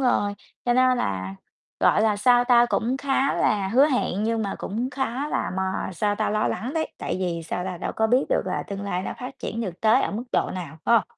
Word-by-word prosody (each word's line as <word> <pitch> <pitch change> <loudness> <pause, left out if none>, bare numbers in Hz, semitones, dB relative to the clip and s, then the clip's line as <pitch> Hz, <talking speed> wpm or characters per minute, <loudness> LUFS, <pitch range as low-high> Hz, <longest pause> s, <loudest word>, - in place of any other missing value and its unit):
rồi, 205 -6 +2 0.3
cho 245 - +3
nên 255 -1 +4
là, 95 -1 -2 0.5
gọi 215 - +4
là, 215 -2 +2
sao 245 +3 +4
tao, 240 -1 +5
cũng 240 +2 0
khá 275 0 +1
là 200 -2 +1
hứa 265 +7 +5
hẹn 250 -8 0
nhưng 225 0 0
mà 200 - -2
cũng 235 +6 -3
khá 270 +1 -2
là - - -1
mà, 190 0 -2
sao 205 +4 0
ta, - - -1
lo 215 0 +1
lắng 245 +5 -3
đấy, 320 -1 0
tại - - -3
vì, 170 -2 -2
sao 180 +2 -3
ta, 185 -2 -4
đâu - - -3
có 220 - +3
biết 250 +4 +3
được - - +2
là - - -1
tương 200 0 -5
lai 185 -2 -2
nó - - -4
phát 255 +2 -7
triển 230 - -4
được 185 -6 -5
tới 225 +4 +4
ở - - -1
mức 225 +5 -4
độ - - +1
nào, 160 -4 -7
phải 235 - +4
hông? - - -4
220 Hz, 245 wpm, -24 LUFS, 190-250 Hz, 0.5 s, tao